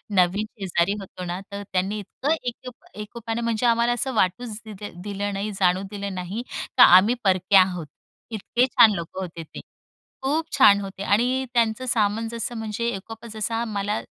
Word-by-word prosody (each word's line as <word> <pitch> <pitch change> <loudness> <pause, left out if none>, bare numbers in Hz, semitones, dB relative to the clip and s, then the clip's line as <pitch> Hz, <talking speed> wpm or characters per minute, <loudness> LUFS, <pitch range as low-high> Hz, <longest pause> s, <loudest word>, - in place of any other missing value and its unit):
नवीन 185 +4 +3
शेजारी 185 0 +1
होतो 185 -1 -8
ना 175 +1 -4
तर 200 0 -5
त्यांनी 195 +3 0
इतकं 280 - -2
एक 245 +1 -5 0.3
एकोपणे 225 +2 -5
म्हणजे 230 0 -1
आम्हाला 235 +1 +3
असं 260 +2 -2
वाटूच 215 +3 0
दिलं 205 -4 -9
दिलं 205 0 -3
नाही 200 +2 -3
जाणवु 185 0 +2
दिलं 200 -2 -5
नाही 185 +6 -4 0.3
का 245 - +10
आम्ही 190 +7 +7
परक्या 190 0 +5
आहोत. 180 -4 -2 0.4
इतके 230 +4 +1
छान 240 -3 +6
लोकं 180 +1 -5
होते 165 -2 -6
ते - - -11 0.6
खूप 305 +4 -1
छान 205 -7 +7
होते 195 0 -7
आणि 250 +6 +1
त्यांचं 230 +1 +1
सामान 220 0 +1
जसं 235 +1 -4
म्हणजे 225 +1 -3
एकोपा 225 +4 -9
जसा 225 +2 -2
मला 205 +2 -1
210 Hz, 165 wpm, -24 LUFS, 190-235 Hz, 0.6 s, का